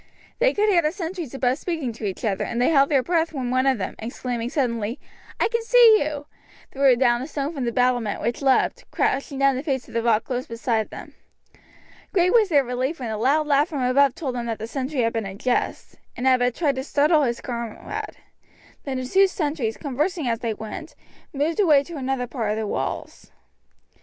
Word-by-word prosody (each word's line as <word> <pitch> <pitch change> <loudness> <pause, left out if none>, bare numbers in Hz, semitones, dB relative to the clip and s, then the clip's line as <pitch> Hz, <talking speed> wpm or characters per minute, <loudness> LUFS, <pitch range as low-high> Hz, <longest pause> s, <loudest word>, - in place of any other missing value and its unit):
They - - +4
could 420 +1 +2
hear 370 -5 +4
the 305 -1 0
sentries 335 - -5
above 260 +1 0
speaking 320 -9 -3
to 220 -1 -7
each 195 +4 -4
other, 195 -3 0
and 235 - -3
they 245 - +3
held 280 -3 +4
their 275 -3 +3
breath 330 0 0
when 255 -4 -3
one 255 +1 +2
of 265 -2 +3
them, 190 - -4
exclaiming 240 +1 -4
suddenly, 235 -5 -1 0.4
"I - - +3
can 465 0 -1
see 455 -2 +6
you!" 295 -1 -5 0.5
threw 270 -2 +4
down 240 -1 +2
a 265 - -5
stone 290 0 -3
from 270 -5 -3
the 235 - 0
battlement, 245 -3 +1
which 235 +3 -2
leapt, 275 - +2
crashing 275 +1 -1
down 275 0 +3
the 260 - -2
face 270 -4 -2
of - - -14
the 230 - 0
rock 225 -2 +2
close 250 -1 -4
beside 230 -1 -1
them. - - -10 1.0
Great 365 -1 +3
was 445 -4 +5
their 290 -4 +4
relief 255 +5 -2
when 240 -4 -4
a 215 - -3
loud 285 +6 +2
laugh 290 +1 +3
from 285 -5 -2
above 265 +1 +3
told 270 -6 -3
them 240 -1 -4
that 225 -1 -2
the 220 - -5
sentry 265 +3 -2
had 230 -1 +1
been 225 -3 -2
in 195 0 -8
jest, 250 +3 -2 0.2
and 245 - -3
had 260 -1 +5
but 245 -1 +1
tried 290 -6 0
to 260 - -2
startle 300 +2 +3
his 240 -4 0
comrade; 235 -3 -6 0.7
then 270 -2 -3
the 255 - -3
two 385 +9 +4
sentries, 290 -11 -2
conversing 300 +2 -2
as 230 -1 0
they 230 -3 -2
went, 220 +10 -8 0.4
moved 300 +6 -1
away 305 -8 +5
to 340 +3 -9
another 265 -2 -2
part 235 -3 -3
of 210 - -1
the 220 - -2
walls. - - -4
265 Hz, 215 wpm, -23 LUFS, 240-305 Hz, 1.0 s, see